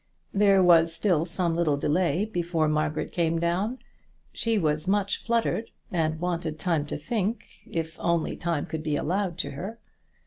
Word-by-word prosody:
There 195 -2 +5
was 165 -2 +6
still 165 -2 +1
some 170 -1 -1
little 160 -4 +2
delay 170 +5 +1
before 170 -6 0
Margaret 155 0 0
came 165 -2 +1
down. 180 +9 0 0.6
She 230 -1 0
was 155 -2 0
much 200 0 +1
fluttered, 230 -1 +1 0.3
and 160 -3 0
wanted 170 -3 -2
time 160 -4 0
to - - -3
think, 215 +7 -2 0.2
if 160 0 -4
only 170 -2 0
time 165 -4 -1
could 160 - -4
be 155 -1 -1
allowed 180 +3 -1
to - - -1
her. 190 +11 -6
170 Hz, 160 wpm, -27 LUFS, 160-190 Hz, 0.6 s, was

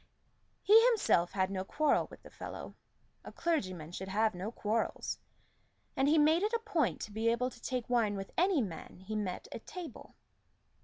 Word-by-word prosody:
He 440 +3 +8
himself 295 - +3
had 190 -1 +1
no 190 -1 -2
quarrel 300 +9 +2
with - - -14
the - - -13
fellow: - - -7 0.5
a - - -9
clergyman 185 - -2
should 190 +2 -6
have 215 +3 +2
no 185 +5 -4
quarrels, 225 0 -2 0.8
and 270 - +2
he 310 +2 +5
made 310 +3 +5
it 425 +3 0
a 465 - +2
point 320 - +1
to - - -5
be 220 +2 +1
able 250 +2 +1
to 235 - -15
take 250 -3 -3
wine 230 -4 +2
with 195 -1 -6
any 355 -6 +3
man 180 -1 -8
he 210 +3 -5
met 195 -4 -3
at - - -8
table. 345 -8 -8
230 Hz, 185 wpm, -33 LUFS, 195-310 Hz, 0.8 s, He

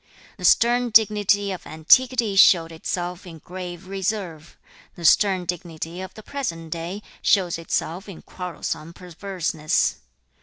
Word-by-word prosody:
The 180 - -5
stern 240 +6 +4
dignity 205 -2 +3
of 185 - -7
antiquity 230 +7 +3
showed 170 -3 +6
itself 175 +3 -4
in 165 -2 -10
grave 180 +2 -8
reserve; 190 -4 -4 0.4
the 170 - -7
stern 190 +2 +4
dignity 170 -1 -5
of 190 0 -9
the 215 - -11
present 165 - -5
day 170 +6 -5 0.2
shows 180 -4 +2
itself 170 +3 -3
in 185 - -11
quarrelsome 170 -2 -6
perverseness. 175 -3 -2
180 Hz, 125 wpm, -23 LUFS, 165-200 Hz, 0.4 s, showed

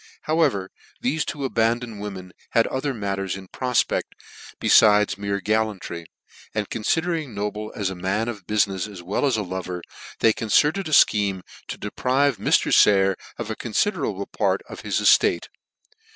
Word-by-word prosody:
However, 145 - +1 0.3
thefe 145 +5 0
two 140 -2 -3
abandoned 115 -2 0
wo 105 - -3
men 95 -2 -9 0.2
had 115 - +4
other 135 +2 -2
matters 100 -5 -3
in 95 -1 -10
profpect 125 -2 0 0.5
befides 105 -1 +5
mere, 100 0 -2
gallantry, 105 -5 -2 0.5
and 105 -2 -1
confidering 160 +2 -1
Noble 105 +1 -4
as 100 -3 -2
a - - -6
man 95 +5 -1
of 105 -6 -6
bu 105 - -3
finefs 100 -1 +1
as 90 -3 -10
well 100 +10 0
as 125 -4 +1
a 105 - -1
lover, 90 -1 -5 0.3
they 110 - +4
concerted 150 - +2
a - - -6
fcheme 100 -9 +4 0.2
to - - -5
deprive 130 +6 0
Mr. - - +2
Sayer 95 -1 +5 0.2
of 115 -2 -4
a - - -3
confiderable 120 - -1
part - - 0
of - - -9
his - - -1
eftate. - - +3
105 Hz, 160 wpm, -23 LUFS, 95-125 Hz, 0.5 s, befides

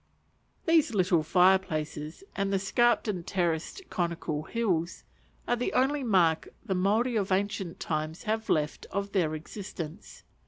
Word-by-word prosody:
These 320 -8 +3
little 180 -3 +3
fire 180 +4 +5
places, 155 - -5
and 195 0 0
the 195 - +3
scarped 235 +5 +2
and 185 -5 -2
terraced 175 - -1
conical 170 -3 -1
hills, 175 -4 -1 0.4
are 240 - +3
the 245 +1 -2
only 270 +2 +2
mark 175 -8 +3 0.2
the 200 - 0
Maori 215 +7 +2
of 200 -3 0
ancient 190 -2 -1
times 155 +1 -3
have 220 +1 -2
left 150 -1 0
of 200 +1 -3
their 165 -6 +1
existence. 170 +1 -8
190 Hz, 145 wpm, -29 LUFS, 165-215 Hz, 0.4 s, fire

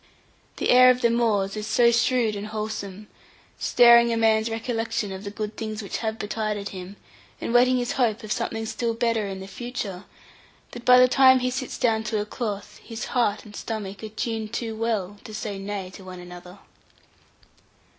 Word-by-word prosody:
The - - +1
air 255 0 +8
of 250 0 +3
the 235 - +3
moors 215 -4 +1
is 215 0 -4
so 235 +1 +4
shrewd 235 -1 +2
and 205 +1 -5
wholesome, 210 -2 -5 0.5
stirring 235 -1 +6
a 230 - 0
man's 220 0 +3
recollection 225 -2 -2
of 190 +1 -7
the 200 - -5
good 210 +1 -5
things 215 -1 -5
which 200 - -4
have 220 -1 -2
betided 210 -1 -3
him, 185 +1 -8 0.4
and - - -3
whetting 250 +1 +5
his 245 -1 -1
hope 235 -2 0
of 215 - -7
something 225 +1 -2
still 230 +1 -2
better 230 -3 0
in 190 -1 -6
the 190 - -8
future, 205 -4 -6 0.7
that 240 -1 -10
by 250 0 +8
the 255 0 +7
time 260 0 +6
he 255 0 -1
sits 255 0 -4
down 220 -2 +1
to 215 0 -1
a 205 - -2
cloth, 210 -3 -5
his 225 -1 -6
heart 230 -4 +1
and 210 -1 -12
stomach 205 -2 -5
are 215 - -5
tuned 220 0 -4
too 230 -2 -3
well 210 -3 -2
to 215 - -9
say 205 -2 -4
'nay' 195 -2 -5
to 190 - -12
one 185 -1 -9
another. 180 +1 -11
220 Hz, 190 wpm, -25 LUFS, 205-235 Hz, 0.7 s, air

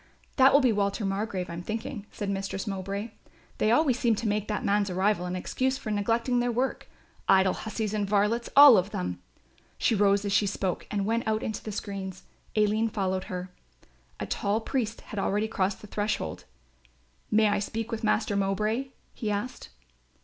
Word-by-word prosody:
"That 265 0 +7
will 285 - +6
be 255 -3 +4
Walter 200 0 0
Margrove, 195 -2 -2
I'm 170 0 -6
thinking," 215 +2 -5
said 205 - -5
Mistress 195 0 -3
Mowbray. 200 +2 -4 0.5
"They 215 - +3
always 255 +1 +3
seem 230 -2 +3
to 225 +2 -3
make 210 0 0
that 210 -2 -2
man's 205 0 +2
arrival 185 0 +1
an 180 - -3
excuse 260 +8 -1
for 220 - -5
neglecting 230 +4 +1
their 245 0 +1
work, 255 +3 -2 0.4
idle 190 -1 +5
hussies 220 -1 -3
and 205 -2 -1
varlets 210 +3 +1
all 280 -5 +10
of 185 +2 +1
them!" 90 - -4 0.6
She - - +2
rose 200 -1 +3
as 200 - -1
she 200 +1 +3
spoke 190 -2 -2
and 200 -2 -1
went 230 +2 0
out 220 0 0
into 220 - -4
the 215 - -5
screens. 195 -2 -5 0.3
Aline 215 +1 +2
followed 190 -3 -1
her. 180 0 -6 0.7
A - - -2
tall 205 +2 0
priest 230 -1 -2
had 210 - -6
already 205 +2 0
crossed 195 -3 -1
the 210 - -10
threshold. 210 +1 -3 0.8
"May 215 0 +4
I 205 - +1
speak 225 +3 -4
with 230 0 -4
Master 215 -1 +1
Mowbray?" 210 +6 0 0.3
he 215 - -3
said. 210 +5 -3
210 Hz, 180 wpm, -28 LUFS, 195-225 Hz, 0.8 s, all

